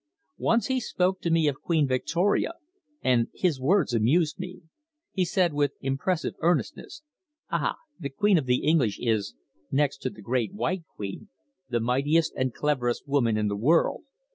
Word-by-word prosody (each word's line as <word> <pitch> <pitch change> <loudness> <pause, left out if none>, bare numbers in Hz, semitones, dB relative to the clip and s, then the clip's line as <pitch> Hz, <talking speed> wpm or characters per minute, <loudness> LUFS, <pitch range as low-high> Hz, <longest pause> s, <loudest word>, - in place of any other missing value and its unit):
Once 230 0 +2
he 260 -1 0
spoke 185 -5 0
to 170 - -1
me 165 -2 +3
of 140 -2 -1
Queen 160 -4 +2
Victoria, 170 - +1 0.5
and 120 -2 +3
his 160 -8 0
words 155 -1 +2
amused 150 - +2
me. 180 0 -7 0.5
He 190 - 0
said 180 -2 +1
with 145 -1 +1
impressive 140 +6 -1
earnestness: 165 - -1 0.5
"Ah! - - 0 0.2
The 140 -5 -4
Queen 200 +5 +3
of 135 - -5
the 125 0 +2
English 145 -10 +3
is, 110 - -1 0.3
next 140 0 +1
to 130 - -2
the 105 - -13
Great 125 - -1
White 185 -4 -2
Queen, 100 - -6 0.4
the 120 -1 +1
mightiest 140 +8 +1
and 130 -1 0
cleverest 125 -3 -1
woman 120 -6 +2
in 105 -1 +1
the 100 - -1
world. 150 +11 +2
145 Hz, 165 wpm, -27 LUFS, 125-175 Hz, 0.5 s, me